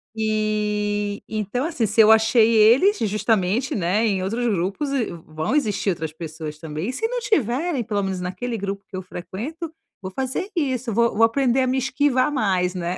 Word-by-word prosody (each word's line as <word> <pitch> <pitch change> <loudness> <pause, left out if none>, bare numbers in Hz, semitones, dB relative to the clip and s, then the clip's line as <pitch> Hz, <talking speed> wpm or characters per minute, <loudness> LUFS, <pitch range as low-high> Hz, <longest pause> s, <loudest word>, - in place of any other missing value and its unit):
E, 210 -1 -1
então 215 +5 -2
assim. 310 -9 -1
Se 210 +3 -2
eu 220 0 +7
achei 220 +1 +5
eles 240 - +5
justamente, 215 +2 0
né, 200 +4 +1
em 190 -3 0
outros 230 +5 -2
grupos 195 - -1
e 265 -5 +1
v 170 - -7
vão 155 - -2
existir 215 -7 0
outras 160 -4 -3
pessoas 155 -1 -7
também. 155 +3 -5
E 255 - -3
se 450 - -1
não - - -2
tiverem, 300 - 0
pelo 205 -2 -1
menos 190 -1 -3
naquele 205 +7 -4
grupo 200 0 -5
que 190 - -10
eu 185 - -3
frequento, 245 - -7 0.3
vou 185 -1 -6
fazer 265 - -3
isso. 260 -7 -1
Vou 235 +1 +2
vou 225 - +3
aprender 260 +2 +2
a 255 - +1
me 260 - +1
esquivar 265 +1 +1
mais, 190 -8 +1
né. 175 0 -3
215 Hz, 190 wpm, -22 LUFS, 190-255 Hz, 0.3 s, eu